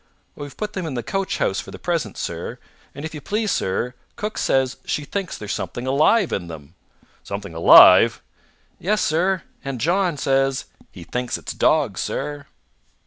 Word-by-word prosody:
"We've 145 -1 -9
put 210 0 -4
them 185 -4 -3
in 140 - -4
the 120 - -3
coachhouse 190 - -1
for - - -7
the - - -9
present, - - -2
sir. - - -5 0.4
And 140 +3 -6
if 160 - -6
you 150 - -7
please, 210 +6 -1
sir, 115 +6 -1 0.2
cook 210 +1 -4
says 130 -1 +1
she 150 - -2
thinks 195 +2 -4
there's 105 -1 -4
something 120 - -5
alive 155 +9 +3
in 90 -3 -2
them." 75 -4 -10 0.5
"Something 100 -4 -6
alive?" 80 +1 +8 0.6
"Yes, 210 +4 0
sir. 175 +3 +1 0.2
And 135 -3 -4
John 175 - +1
says 135 0 +1 0.3
he 85 - -11
thinks 125 +7 -3
it's - - -7
dogs, - - +2
sir!" 145 -1 -4
145 Hz, 165 wpm, -22 LUFS, 125-185 Hz, 0.6 s, alive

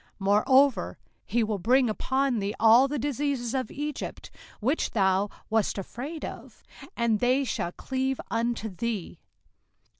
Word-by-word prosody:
05:028:060 - - -31
Moreover 255 +7 +3 0.3
he 235 -1 +1
will 215 -2 -2
bring 250 +6 +3
upon 260 +3 0
thee 200 +1 -2
all 230 +4 +7
the 295 +2 -3
diseases 275 -2 -2
of 260 -4 -1
Egypt, 295 0 -5 0.3
which 265 +9 0
thou 195 -1 +2 0.2
wast 220 -2 0
afraid 270 - -6
of; - - -10 0.3
and 230 -3 +2
they 255 +4 +2
shall 205 -8 -2
cleave 265 +5 -2
unto 230 -1 -1
thee. 210 0 -4
240 Hz, 140 wpm, -27 LUFS, 215-270 Hz, 0.3 s, all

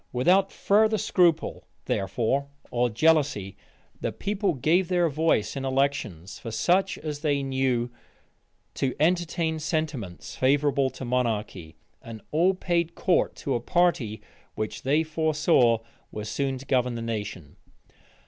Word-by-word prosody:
Without 185 +10 +3
further 215 +2 +3
scruple, 175 -5 +1 0.2
therefore, 115 +8 0 0.2
or 120 0 +1
jealousy, 135 -6 +2 0.4
the - - -2
people 200 -3 -1
gave 170 +8 +2
their 175 -2 +2
voice 145 -8 +1
in 135 - -4
elections 130 - -1
for 115 - -7
such 180 - +1
as 150 -2 -5
they 145 -2 0
knew 130 -3 0 0.8
to 130 -2 -1
entertain 165 0 +1
sentiments 150 - -3
favorable 140 0 +2
to 130 - -8
monarchy; 110 -9 -2 0.3
and 115 -1 -9
all 175 +5 +3
paid 170 -2 -1
court 180 - +1
to 140 - -3
a 120 - +1
party, 120 - 0 0.3
which 110 0 -4
they 150 +4 +2
foresaw 155 -6 +2 0.3
was 105 0 -6
soon 135 +1 -1
to 130 - -11
govern 125 -3 +1
the 115 - -4
nation. 105 -9 -5
140 Hz, 130 wpm, -26 LUFS, 120-165 Hz, 0.8 s, Without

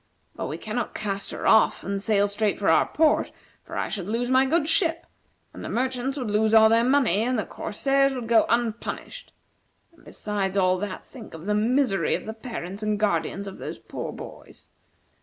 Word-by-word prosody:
But - - -4
we 155 - -4
cannot 215 +5 -4
cast 200 -2 -3
her - - -6
off 220 - +4
and 195 0 -3
sail 205 -1 +2
straight 205 0 0
for 200 - +1
our - - +4
port, 310 -1 +2 0.3
for - - -8
I - - -1
should 195 -2 -5
lose 240 +3 -1
my 260 +1 +4
good 310 +1 +1
ship, 330 0 +1 0.5
the - - -7
merchants 260 +2 -1
would 245 -6 -3
lose 215 +1 +3
all 220 0 +8
their 230 +1 +4
money, 255 -7 +3
and 250 +2 0
the 215 - -1
corsairs 275 +5 0
would 245 -3 -5
go 230 -1 +4
unpunished; 235 - -2 0.6
and, 335 - -23
besides 200 -2 -3
all 185 -1 +3
that, 200 -1 -5
think 235 -10 -11
of 160 +2 -10
the 210 - 0
misery 225 0 +2
of - - -6
the 220 - -5
parents 220 -4 -7
and 210 -1 -1
guardians 200 -1 0
of 195 -1 -9
those - - -6
poor - - -6
boys. - - -12
220 Hz, 195 wpm, -25 LUFS, 205-255 Hz, 0.6 s, all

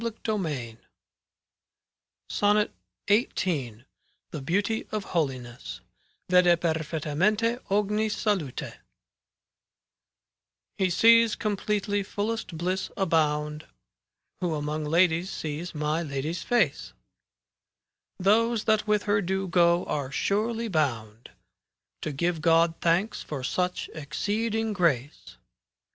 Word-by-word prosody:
5S 230 -1 -3
CANZONIERE 150 - -2 1.5
SONNET 210 - +2 0.3
XVIII 205 +1 +6 0.2
^b 140 - -1
V 115 - -22 0.3
>| - - -47
THE 155 - -5
BEAUTY 200 +9 -1
OF 215 -2 -2
HOLINESS 130 -9 -3 0.5
Vede 175 -1 +5
perfettamente 170 - 0
ogni 210 +2 +1
salute 195 - -2 2.0
He 190 -1 +2
sees 230 +4 +5
completely 205 -1 -1
fullest 205 -2 -3
bliss 185 +3 -2
abound 150 -4 0 0.7
Who 175 -4 -1
among 150 +1 -3
ladies 170 +3 +2
sees 160 +2 -5
my 150 +2 0
Lady's 155 +2 -3
face; 145 - 0 1.2
Those 220 +4 +2
that 215 0 +2
with 210 -1 +2
her 205 -1 +2
do 190 +1 -1
go 170 0 +3
are 140 -3 -3
surely 225 +8 0
bound 120 - -2 0.7
To 155 - -3
give 165 +3 -1
God 165 0 +4
thanks 175 +6 +1
for 140 -4 -6
such 180 +7 -1
exceeding 215 +8 -2
grace. 150 - -1
175 Hz, 105 wpm, -27 LUFS, 150-210 Hz, 2.0 s, XVIII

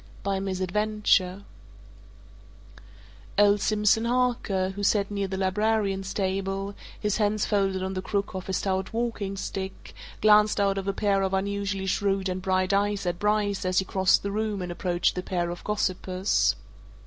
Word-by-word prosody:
BY 195 -1 0
MISADVENTURE 195 0 0 1.9
Old 205 0 +5
Simpson 215 +1 +2
Harker, 235 -6 0
who 200 +1 -7
sat 200 0 +2
near 200 -1 -1
the 190 0 -4
librarian's 195 0 0
table, 195 0 -2 0.3
his 210 -1 0
hands 210 -1 +1
folded 195 -2 0
on 190 0 -3
the 185 - -3
crook 200 +1 -2
of 185 -1 -6
his 190 - 0
stout 190 0 -2
walking 225 -4 -2
stick, 190 0 -6 0.3
glanced 210 0 +5
out 195 -1 +2
of 195 - -6
a - - +2
pair 200 -1 +1
of 190 0 0
unusually 200 0 -2
shrewd 195 0 0
and 185 0 -3
bright 185 +1 +1
eyes 200 0 +1
at 175 -1 -2
Bryce 210 -1 +1
as 185 0 0
he 190 - +3
crossed 190 -1 +3
the 200 - -2
room 210 -2 -2
and 180 - -5
approached 175 0 0
the 180 - -3
pair 175 -2 -2
of 175 - -8
gossipers. 190 -2 0
195 Hz, 160 wpm, -26 LUFS, 190-205 Hz, 1.9 s, Old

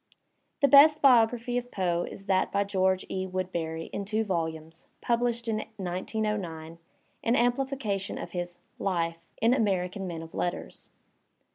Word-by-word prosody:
The 280 - +6
best 295 +3 +8
biography 245 -2 +4
of 245 0 -10
Poe 175 -4 0
is 195 - -11
that 190 -1 +1
by 200 0 +2
George 190 -2 +1
E. 190 0 -3
Wood 185 0 -3
beny 160 -1 -3
in 200 - -2
two 215 +2 0
volumes, 165 -4 -4
published 235 0 0
in 220 -1 0 0.2
1909, 180 -3 -3 0.4
an 230 - +2
amplification 245 -5 0
of - - -6
his 175 -1 -4 0.2
"life 170 -3 -2 0.2
in 230 +2 +5
American 195 -5 0
Men 165 -2 -5
of 165 - -12
Letters. 175 - -4
195 Hz, 145 wpm, -28 LUFS, 175-230 Hz, 0.4 s, best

